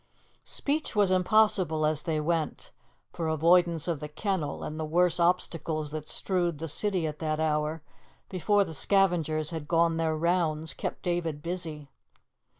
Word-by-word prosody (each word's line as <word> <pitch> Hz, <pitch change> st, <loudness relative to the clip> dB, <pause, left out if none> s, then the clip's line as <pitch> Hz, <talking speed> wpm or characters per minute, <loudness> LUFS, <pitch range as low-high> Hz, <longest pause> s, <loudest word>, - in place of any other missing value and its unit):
Speech 295 Hz, -2 st, -2 dB
was 205 Hz, -3 st, +4 dB
impossible 185 Hz, -4 st, +3 dB
as 155 Hz, -1 st, +2 dB
they 155 Hz, -1 st, -1 dB
went, 160 Hz, 0 st, -2 dB, 0.4 s
for 165 Hz, -2 st, -3 dB
avoidance 165 Hz, +1 st, +3 dB
of 165 Hz, -4 st, -1 dB
the 150 Hz, -, -5 dB
kennel 180 Hz, 0 st, -3 dB
and 155 Hz, +1 st, -5 dB
the -, -, -2 dB
worse 175 Hz, +3 st, +2 dB
obstacles 165 Hz, -3 st, 0 dB
that 155 Hz, -1 st, -6 dB
strewed 175 Hz, -4 st, 0 dB
the 165 Hz, +2 st, -5 dB
city 185 Hz, +2 st, 0 dB
at 155 Hz, -1 st, -4 dB
that 155 Hz, -1 st, -2 dB
hour, 155 Hz, 0 st, -1 dB, 0.4 s
before 200 Hz, +3 st, +2 dB
the 165 Hz, -, -7 dB
scavengers 160 Hz, -3 st, +1 dB
had 160 Hz, -3 st, -5 dB
gone 165 Hz, 0 st, +2 dB
their 160 Hz, -1 st, 0 dB
rounds, 160 Hz, -2 st, 0 dB
kept -, -, -5 dB
David 165 Hz, -4 st, -2 dB
busy. 165 Hz, -4 st, -3 dB
165 Hz, 155 wpm, -28 LUFS, 155-180 Hz, 0.4 s, was